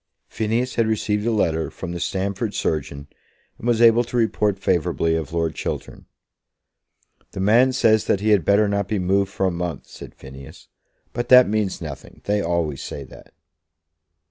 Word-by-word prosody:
Phineas 115 Hz, +3 st, -2 dB
had 115 Hz, -1 st, +2 dB
received 105 Hz, 0 st, -1 dB
a -, -, +2 dB
letter 80 Hz, -7 st, 0 dB
from 90 Hz, -, -7 dB
the 85 Hz, -, -5 dB
Stamford 100 Hz, +4 st, -3 dB
surgeon, 70 Hz, -2 st, -3 dB, 0.5 s
and 115 Hz, -, -6 dB
was 120 Hz, -1 st, +3 dB
able 115 Hz, +1 st, +6 dB
to 120 Hz, -, -4 dB
report 105 Hz, -3 st, +1 dB
favourably 85 Hz, -3 st, 0 dB
of 80 Hz, -2 st, -4 dB
Lord 80 Hz, -1 st, -1 dB
Chiltern. -, -, -6 dB, 1.3 s
"The -, -, -6 dB
man 115 Hz, +7 st, +4 dB
says 110 Hz, -4 st, +2 dB
that 100 Hz, -, +1 dB
he 105 Hz, +2 st, -1 dB
had 105 Hz, -5 st, +4 dB
better 100 Hz, +5 st, +3 dB
not 100 Hz, -1 st, -1 dB
be 105 Hz, -, -1 dB
moved 95 Hz, +1 st, +1 dB
for 95 Hz, -, -1 dB
a 95 Hz, -, +1 dB
month," 85 Hz, -4 st, -4 dB
said -, -, -12 dB
Phineas. 65 Hz, 0 st, -13 dB, 0.4 s
"But 120 Hz, 0 st, -4 dB
that 125 Hz, 0 st, +8 dB
means 105 Hz, -3 st, -1 dB
nothing. 75 Hz, -4 st, -9 dB
They 105 Hz, 0 st, 0 dB
always 85 Hz, -6 st, -2 dB
say 70 Hz, -, -7 dB
that." 65 Hz, -, -15 dB
100 Hz, 170 wpm, -22 LUFS, 85-110 Hz, 1.3 s, that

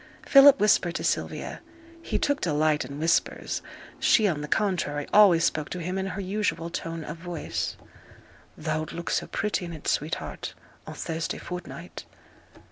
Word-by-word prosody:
Philip 275 Hz, 0 st, +8 dB
whispered 185 Hz, -4 st, +3 dB
to -, -, -3 dB
Sylvia -, -, -2 dB, 0.4 s
(he -, -, -2 dB
took 285 Hz, 0 st, 0 dB
delight 155 Hz, -2 st, +2 dB
in 140 Hz, +2 st, -8 dB
whispers, 165 Hz, +3 st, 0 dB, 0.4 s
she, 215 Hz, -3 st, +4 dB
on 155 Hz, -6 st, -1 dB
the 150 Hz, -, -5 dB
contrary, 165 Hz, -8 st, 0 dB
always 190 Hz, -6 st, +7 dB
spoke 155 Hz, -2 st, 0 dB
to 180 Hz, -, -4 dB
him 180 Hz, +2 st, -3 dB
in 190 Hz, -, -2 dB
her 195 Hz, -, -5 dB
usual 190 Hz, -3 st, -2 dB
tone 165 Hz, -2 st, -4 dB
of 150 Hz, +2 st, -6 dB
voice) 170 Hz, -1 st, -4 dB, 0.8 s
'Thou'lt 155 Hz, 0 st, -3 dB
look 170 Hz, 0 st, -4 dB
so -, -, 0 dB
pretty 210 Hz, -3 st, -1 dB
in 170 Hz, -1 st, -6 dB
it, 155 Hz, -, -9 dB
sweetheart, 155 Hz, +2 st, -2 dB, 0.3 s
o' -, -, -6 dB
Thursday 165 Hz, 0 st, -3 dB
fortnight!' 175 Hz, -1 st, -8 dB
170 Hz, 155 wpm, -26 LUFS, 155-195 Hz, 0.8 s, Philip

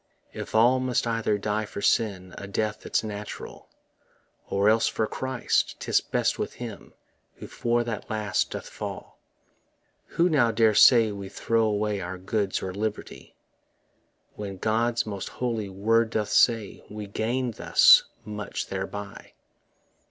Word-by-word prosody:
If -, -, -7 dB
all 120 Hz, +4 st, +5 dB
must 130 Hz, -2 st, 0 dB
either 115 Hz, -2 st, 0 dB
die 105 Hz, +1 st, -2 dB
for 100 Hz, -, -8 dB
sin 95 Hz, -4 st, 0 dB
A 100 Hz, -, -8 dB
death 105 Hz, +2 st, -2 dB
that's -, -, -1 dB
natural, 105 Hz, -1 st, -8 dB, 0.8 s
Or 100 Hz, +1 st, +1 dB
else 110 Hz, +1 st, +4 dB
for 110 Hz, -, 0 dB
Christ, 130 Hz, +2 st, -1 dB
'tis -, -, +1 dB
best -, -, -1 dB
with -, -, -3 dB
him -, -, -9 dB, 0.4 s
Who -, -, -10 dB
for 120 Hz, 0 st, 0 dB
the 115 Hz, -2 st, -4 dB
last 105 Hz, -2 st, -1 dB
doth -, -, -6 dB
fall. -, -, -8 dB, 1.0 s
Who 170 Hz, -, +5 dB
now 140 Hz, -9 st, +3 dB
dare 110 Hz, -1 st, +3 dB
say 115 Hz, 0 st, +6 dB
we 100 Hz, -1 st, -7 dB
throw 115 Hz, +2 st, 0 dB
away 105 Hz, -1 st, -1 dB
Our 90 Hz, +1 st, -5 dB
goods 95 Hz, +1 st, -2 dB
or 95 Hz, -1 st, -4 dB
liberty, 105 Hz, +2 st, -5 dB, 1.0 s
When 100 Hz, -2 st, -6 dB
God's 115 Hz, +4 st, 0 dB
most 100 Hz, -3 st, -5 dB
holy 115 Hz, -5 st, -3 dB
word 110 Hz, +4 st, +2 dB
doth 110 Hz, -2 st, -2 dB
say 115 Hz, -4 st, +2 dB
We 105 Hz, 0 st, -6 dB
gain 120 Hz, +5 st, -2 dB
thus -, -, +6 dB, 0.2 s
much 105 Hz, -1 st, -5 dB
thereby? 100 Hz, +1 st, -6 dB
110 Hz, 145 wpm, -26 LUFS, 100-115 Hz, 1.0 s, say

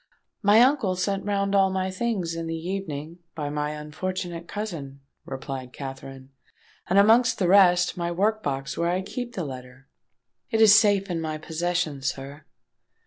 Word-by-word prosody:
"My 210 Hz, +1 st, +6 dB
uncle 250 Hz, -8 st, +3 dB
sent 195 Hz, +1 st, -2 dB
round 200 Hz, -1 st, 0 dB
all 195 Hz, -1 st, +4 dB
my 190 Hz, 0 st, -2 dB
things 185 Hz, -4 st, -2 dB
in 165 Hz, 0 st, -4 dB
the 165 Hz, 0 st, -3 dB
evening, 165 Hz, -2 st, -5 dB, 0.2 s
by 145 Hz, -2 st, -3 dB
my 150 Hz, 0 st, -2 dB
unfortunate 170 Hz, +3 st, -5 dB
cousin," 160 Hz, -10 st, -6 dB, 0.2 s
replied 130 Hz, -1 st, -6 dB
Katherine; 135 Hz, -1 st, -9 dB, 0.6 s
"and 185 Hz, -, +2 dB
amongst 225 Hz, +4 st, +5 dB
the 185 Hz, -, +1 dB
rest, 180 Hz, -2 st, +5 dB
my 170 Hz, -1 st, -2 dB
work 215 Hz, +5 st, +1 dB
box 135 Hz, -3 st, -3 dB
where 170 Hz, 0 st, 0 dB
I 185 Hz, +2 st, 0 dB
keep 240 Hz, +5 st, -6 dB
the 180 Hz, -, -3 dB
letter. 130 Hz, 0 st, -10 dB, 0.6 s
It 225 Hz, -, 0 dB
is 220 Hz, -2 st, +8 dB
safe 205 Hz, -3 st, +4 dB
in 165 Hz, -2 st, -2 dB
my 155 Hz, -1 st, -3 dB
possession, 160 Hz, -2 st, -2 dB
sir." 135 Hz, +2 st, -5 dB
175 Hz, 160 wpm, -25 LUFS, 150-200 Hz, 0.6 s, is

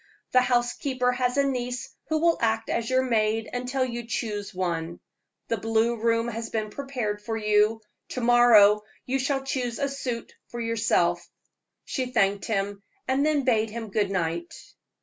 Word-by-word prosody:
The 255 Hz, -, +5 dB
housekeeper 250 Hz, +1 st, +1 dB
has 250 Hz, +1 st, 0 dB
a 280 Hz, -, +4 dB
niece 250 Hz, -2 st, -3 dB, 0.2 s
who 315 Hz, -, +2 dB
will 335 Hz, +1 st, +2 dB
act 225 Hz, -1 st, 0 dB
as 230 Hz, -1 st, -1 dB
your 260 Hz, 0 st, +3 dB
maid 225 Hz, -2 st, +1 dB
until 255 Hz, +1 st, -1 dB
you 240 Hz, -2 st, -5 dB
choose 210 Hz, -3 st, -3 dB
one. 170 Hz, -2 st, -3 dB, 0.5 s
The 230 Hz, -, 0 dB
blue 225 Hz, +2 st, +1 dB
room 230 Hz, +1 st, +1 dB
has 230 Hz, 0 st, -4 dB
been 215 Hz, -1 st, -3 dB
prepared 245 Hz, -6 st, -3 dB
for 225 Hz, +2 st, -3 dB
you; 210 Hz, +1 st, +2 dB, 0.3 s
to 255 Hz, -, -4 dB
morrow 230 Hz, -4 st, +6 dB, 0.2 s
you 265 Hz, +1 st, 0 dB
shall 270 Hz, 0 st, 0 dB
choose 250 Hz, -3 st, -2 dB
a 280 Hz, -, 0 dB
suit 255 Hz, -4 st, -5 dB
for 240 Hz, -, -7 dB
yourself." 230 Hz, -1 st, +1 dB, 0.6 s
She 260 Hz, -1 st, -2 dB
thanked 200 Hz, -5 st, +1 dB
him, 200 Hz, -2 st, -2 dB, 0.3 s
and 265 Hz, +2 st, +2 dB
then 300 Hz, -2 st, +2 dB
bade 225 Hz, -4 st, +2 dB
him 225 Hz, 0 st, -6 dB
good 205 Hz, -1 st, +1 dB
night. 170 Hz, -2 st, -2 dB
235 Hz, 165 wpm, -26 LUFS, 215-255 Hz, 0.6 s, morrow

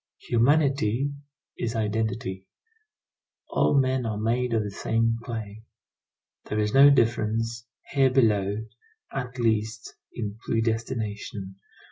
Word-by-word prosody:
Humanity 140 Hz, 0 st, +2 dB, 0.5 s
is 115 Hz, 0 st, -2 dB
identity. 110 Hz, -3 st, -2 dB, 1.0 s
All 140 Hz, -, +3 dB
men 130 Hz, -1 st, +1 dB
are 110 Hz, -2 st, -2 dB
made 120 Hz, +3 st, 0 dB
of 110 Hz, -, +2 dB
the 105 Hz, -, -5 dB
same 115 Hz, +2 st, 0 dB
clay. 110 Hz, -3 st, -6 dB, 0.8 s
There 105 Hz, -, -3 dB
is 105 Hz, 0 st, 0 dB
no 140 Hz, +1 st, +9 dB
difference, 115 Hz, -2 st, +1 dB, 0.2 s
here 135 Hz, -2 st, +4 dB
below, 110 Hz, -4 st, +2 dB, 0.5 s
at 125 Hz, -1 st, -4 dB
least, 110 Hz, -2 st, -1 dB, 0.2 s
in 105 Hz, -2 st, -5 dB
predestination. 110 Hz, -3 st, -2 dB
115 Hz, 105 wpm, -26 LUFS, 105-125 Hz, 1.0 s, no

